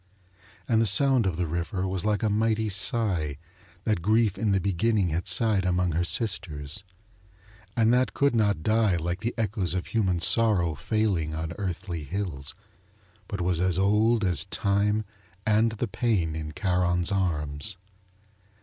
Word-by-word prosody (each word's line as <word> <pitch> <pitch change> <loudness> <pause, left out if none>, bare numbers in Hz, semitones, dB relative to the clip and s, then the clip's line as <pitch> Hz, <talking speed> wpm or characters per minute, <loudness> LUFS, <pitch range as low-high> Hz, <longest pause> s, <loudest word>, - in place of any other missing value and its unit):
And 115 -2 +3
the 115 - +3
sound 125 +2 +4
of 85 -4 -2
the 90 - 0
river 85 +3 -2
was 95 -1 -3
like 105 -1 0
a 110 - +2
mighty 110 +1 +1
sigh 95 -7 0 0.5
that 105 -6 0
Grief 110 +2 +2
in 110 -2 0
the 100 - +3
beginning 100 +1 +1
had 85 +4 -2
sighed 100 +1 +3
among 90 -1 +1
her 85 +3 0
sisters, 85 -7 -3 0.9
and 115 0 +4
that 125 +1 +1
could 140 -1 +2
not 100 -7 +1
die 110 -2 +2
like 85 +2 -2
the 115 +4 -3
echoes 105 -5 -1
of 90 - -2
human 95 -6 0
sorrow 95 -4 +3
failing 85 - -1
on 80 +1 -4
earthly 90 -4 -4
hills, 75 -4 -4 0.7
but 100 - -4
was 90 -1 0
as 90 -1 +1
old 105 +4 +3
as 90 -2 +1
time 105 +2 0 0.4
and 110 +1 +3
the 115 +2 -3
pain 95 -7 0
in 75 -1 -5
Charon's 90 -1 +1
arms. 80 -2 -2
95 Hz, 155 wpm, -26 LUFS, 85-110 Hz, 0.9 s, sound